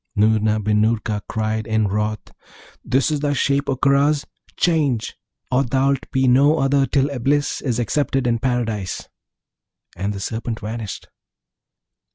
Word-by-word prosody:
Noorna 110 0 +3
bin 105 0 +1
Noorka 110 -1 0
cried 110 -1 -2
in 110 -1 +1
wrath, 105 +2 -2 0.5
'This 130 +3 +1
is 150 - 0
thy 145 0 0
shape, 140 0 0
O 135 - +1
Karaz; 140 +2 +2 0.3
change! 145 -10 +1 0.4
or 130 +2 +3
thou'lt 135 +1 0
be 130 0 +1
no 140 +5 +5
other 135 -1 +2
till 140 0 +1
Eblis 140 +3 0
is 125 -5 -1
accepted 135 +2 0
in 115 -1 +1
Paradise.' 115 -6 -2 0.9
And 100 +3 -2
the 100 - -5
Serpent 115 +2 -4
vanished. 110 -1 -6
125 Hz, 140 wpm, -21 LUFS, 110-140 Hz, 0.9 s, no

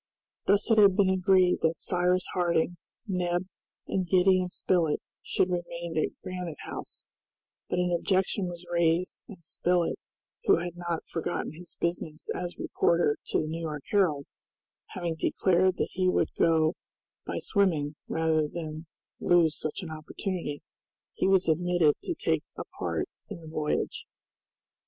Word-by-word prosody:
Thus 205 +3 +3
it 220 - +6
had 200 -3 +7
been 195 -2 +4
agreed 185 -1 +4
that 160 0 +2
Cyrus 180 0 +1
Harding, 175 -1 +1 0.3
Neb, 180 -1 0 0.4
and 185 -2 -1
Gideon 185 -1 +4
Spilett 170 -4 +1 0.2
should 185 - 0
remain 170 -1 -4
at 155 - -1
Granite 180 -4 -5
House, - - -7 0.7
but 180 - 0
an 180 -1 +2
objection 190 +2 +1
was 175 0 -8
raised, 170 +1 +1
and 185 -5 -12
Spilett, 175 +1 +1 0.5
who - - +6
had 175 0 -4
not 175 -2 -3
forgotten 165 - -3
his 170 +2 -10
business 170 -2 -2
as 180 -1 -5
reporter 170 -4 +2
to - - +1
the - - -3
New 165 +2 -4
York 150 -3 -4
Herald, 165 -9 +2 0.7
having 175 -3 -2
declared 185 +2 +2
that - - 0
he 185 0 +1
would - - +1
go 160 -1 +3 0.5
by - - -2
swimming 165 -8 +1
rather 160 -1 +1
than 155 0 -6 0.3
lose 170 -3 +4
such 155 +5 -3
an 165 - -6
opportunity, 155 0 -4 0.5
he - - 0
was 190 -2 +4
admitted 170 -1 +3
to 350 - -3
take - - 0
a - - -3 0.2
part - - -1 0.2
in 205 -5 -6
the 160 - -12
voyage. 155 -1 -2
175 Hz, 145 wpm, -28 LUFS, 160-185 Hz, 0.7 s, had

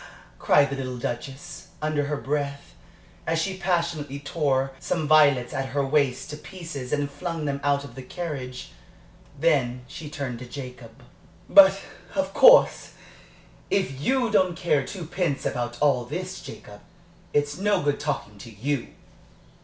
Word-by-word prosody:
cried 140 - +5
the - - -1
little 130 -2 -4
Duchess, 130 +3 -6
under 155 -1 0
her 145 0 -2
breath, 140 0 -3 0.5
as 165 0 +1
she 190 +3 -2
passionately 170 -6 -1
tore 140 -2 0
some 160 -3 -2
violets 145 -5 +5
at 135 0 -2
her 140 -1 +2
waist 135 -2 +1
to 150 - -6
pieces 150 -7 -8
and 145 -1 +1
flung 165 +2 -4
them 140 -1 -2
out 140 0 +2
of 140 -4 -10
the 130 - -8
carriage. 130 -4 -6 0.7
Then 130 -6 +1
she 150 +2 -8
turned 135 -5 -5
to 125 - -8
Jacob. 125 -3 -9 0.4
"But, 195 0 +8 0.4
of - - -1
course, - - +6 0.8
if 135 -9 0
you 250 - +1
don't 185 -4 +3
care 150 -5 +2
twopence 175 -2 -3
about 120 -1 -2
all 140 -4 +3
this, - - -5
Jacob, 105 0 -11 0.5
it's 145 +1 0
no 205 -2 +2
good 145 0 +1
talking 135 -8 -3
to 115 - -10
you!" 120 +5 -2
145 Hz, 145 wpm, -25 LUFS, 130-165 Hz, 0.8 s, But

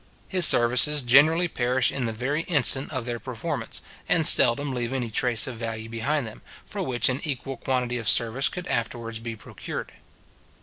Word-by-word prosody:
His 180 -5 +5
services 125 +5 +3
generally 155 +8 +4
perish 125 -4 -1
in 130 -3 -4
the 115 - -3
very 130 +8 -3
instant 140 -4 +2
of 130 -5 -5
their 120 -1 -5
performance, - - -6 0.3
and - - +1
seldom 135 +3 +6
leave 120 0 -4
any 125 -4 -4
trace 120 0 0
of 125 -3 -7
value 115 -1 -6
behind 120 +5 -2
them, 110 - -11 0.2
for - - -6
which 125 -2 0
an 130 +1 -1
equal 135 -3 -5
quantity 125 -2 -3
of 115 - 0
service 120 +4 +3
could 180 0 -8
afterwards 115 -4 -4
be 115 0 -7
procured. 105 - -8
125 Hz, 175 wpm, -24 LUFS, 115-140 Hz, 0.3 s, seldom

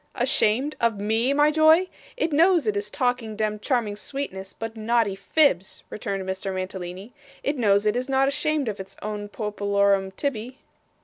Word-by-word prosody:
'Ashamed 260 +1 +1
of 230 -3 +1
ME, 225 +5 +1
my 295 +1 +4
joy? 315 +4 +5 0.3
It 325 -9 0
knows 335 -1 +4
it 210 -2 0
is 205 +1 -2
talking 245 -3 -1
demd 215 -1 -1
charming 230 -4 0
sweetness, 205 -6 -6
but 225 0 -7
naughty 220 -2 +1
fibs,' 195 - +1
returned 195 -2 -4
Mr. 190 +1 -3
Mantalini. 185 +3 -6 0.3
'It 285 - 0
knows 205 -5 +3
it 210 +1 +2
is 255 +2 -2
not 270 0 +3
ashamed 290 0 0
of 210 -2 -3
its 195 0 -9
own 210 -1 -4
popolorum 200 -2 +1
tibby. 255 -2 -3
220 Hz, 165 wpm, -25 LUFS, 200-270 Hz, 0.3 s, joy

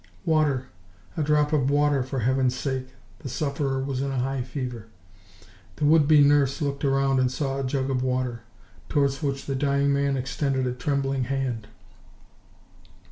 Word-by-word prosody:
"Water, 150 -5 +2 0.5
a - - -1
drop 150 0 +2
of 140 -3 +2
water, 145 -1 +2
for 130 0 -3
Heaven's 130 +1 +1
sake!" 130 -1 -3 0.3
The 135 - -7
sufferer 135 0 -1
was 135 -1 -2
in 140 - -1
a 135 - -2
high 135 +1 -1
fever. 125 -3 -5 0.9
The 150 - -1
would 150 -1 +5
be 150 -2 +7
nurse 140 -1 +3
looked 140 -2 -2
round 135 -1 +2
and 130 -1 +2
saw 135 0 -2
a - - -2
jug 135 0 -1
of 130 -1 0
water, 125 -2 -1 0.5
towards 140 -2 +1
which 140 -2 -2
the 140 - -2
dying 140 +1 +1
man 140 -1 +1
extended 135 0 -1
a 125 - -1
trembling 135 0 -1
hand. 125 -4 -2
135 Hz, 165 wpm, -25 LUFS, 130-140 Hz, 0.9 s, be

